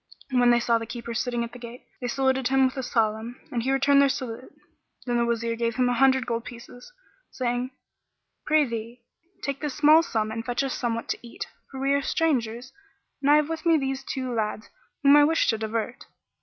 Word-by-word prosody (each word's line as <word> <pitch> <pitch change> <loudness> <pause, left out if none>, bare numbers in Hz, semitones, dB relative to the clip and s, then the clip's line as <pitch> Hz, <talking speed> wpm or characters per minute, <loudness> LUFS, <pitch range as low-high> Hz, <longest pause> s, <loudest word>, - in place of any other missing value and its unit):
When 245 -1 +4
they 240 0 +5
saw 235 -1 +2
the 225 - -6
keeper 235 0 -6
sitting 240 0 -1
at 235 - -6
the 245 - -11
gate, 240 +1 -10 0.2
they 245 - -3
saluted 265 0 +1
him 265 0 +3
with 260 - 0
the 265 - -4
Salam 225 0 -1
and 240 - -1
he 260 +3 0
returned 275 +1 +4
their 280 - +4
salute. 255 -2 -5 0.5
Then 240 -1 0
the 235 - +2
Wazir 230 0 -1
gave 230 -1 -1
him 250 -1 +2
an - - +1
hundred 265 0 +4
gold 230 -1 -2
pieces, 245 - -11 0.4
saying, 245 0 -2 0.8
"Prithee, 240 -6 0 0.4
take 280 -1 -3
this 295 -3 -3
small 305 +2 +6
sum 220 -9 -2
and 225 +1 -4
fetch 245 +2 -1
us 270 - -2
somewhat 230 -2 -2
to - - -2
eat; 235 -1 -7 0.2
for 265 - -8
we 275 +1 +1
are 280 - +2
strangers 255 -6 -1 0.5
and 280 - +1
I 295 - +7
have 300 -1 +3
with 325 -1 -4
me 330 -1 +4
these 270 -1 -2
two 255 -1 -4
lads 215 -1 -3 0.3
whom 280 +1 +7
I 295 - +7
wish 325 +2 +2
to 220 - +2
divert." 225 +2 -3
245 Hz, 210 wpm, -25 LUFS, 235-270 Hz, 0.8 s, I